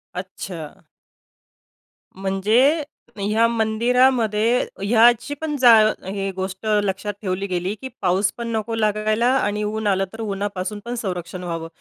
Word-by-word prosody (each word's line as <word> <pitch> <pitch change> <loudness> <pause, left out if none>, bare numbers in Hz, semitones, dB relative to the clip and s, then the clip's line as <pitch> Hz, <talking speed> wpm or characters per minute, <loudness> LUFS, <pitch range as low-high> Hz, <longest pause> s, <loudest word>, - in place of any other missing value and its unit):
अच्छा. 180 -3 -7 1.3
म्हणजे 215 - +2 0.3
ह्या 215 +3 +2
मंदिरामध्ये 230 0 +2 0.2
हयाचीपण 240 +8 +2
जा 245 -3 +7 0.3
हे 195 0 -3
गोष्ट 190 +2 -5 0.2
लक्षात 200 +1 -2
ठेवली 195 0 -2
गेली, 180 +2 -2
की 260 +5 -8
पाऊस 190 +2 +2
पण 235 -1 -4
नको 225 0 -2
लागायला 215 +1 +1
आणि 210 -3 -1
ऊन 215 0 -2
आलं, 195 -1 +2
तर 225 - -7
उन्हापासून 200 -1 -3
पण 240 +1 -4
संरक्षण 180 -4 -5
व्हावं. 165 -2 -4
210 Hz, 120 wpm, -22 LUFS, 190-230 Hz, 1.3 s, जा